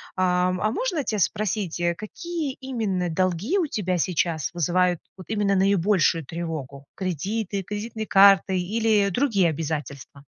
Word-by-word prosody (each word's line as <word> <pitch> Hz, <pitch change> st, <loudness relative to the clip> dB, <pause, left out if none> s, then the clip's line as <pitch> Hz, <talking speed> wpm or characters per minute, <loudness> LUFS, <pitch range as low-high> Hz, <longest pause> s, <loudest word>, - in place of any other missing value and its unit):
Ам, 180 Hz, 0 st, +1 dB
а 215 Hz, -, +1 dB
можно 355 Hz, -, -1 dB
тя 215 Hz, -, -2 dB
спросить, 200 Hz, -2 st, -1 dB
э, 170 Hz, 0 st, +1 dB
какие 310 Hz, -, -5 dB
именно 215 Hz, -9 st, -2 dB
долги 185 Hz, -, 0 dB
у 340 Hz, -, +1 dB
тебя 185 Hz, -7 st, -1 dB
сейчас 170 Hz, -3 st, 0 dB
вызывают 175 Hz, +1 st, +1 dB, 0.2 s
вот 185 Hz, -, -12 dB
именно 205 Hz, -2 st, +1 dB
наибольшую 190 Hz, -3 st, +2 dB
тревогу: 145 Hz, -4 st, -6 dB
кредиты, 195 Hz, +3 st, -3 dB
кредитные 215 Hz, +3 st, -5 dB
карты 195 Hz, -1 st, +5 dB
или 210 Hz, +1 st, +1 dB
другие 200 Hz, -5 st, +2 dB
обязательства? 145 Hz, -3 st, -5 dB
190 Hz, 135 wpm, -24 LUFS, 170-215 Hz, 0.2 s, карты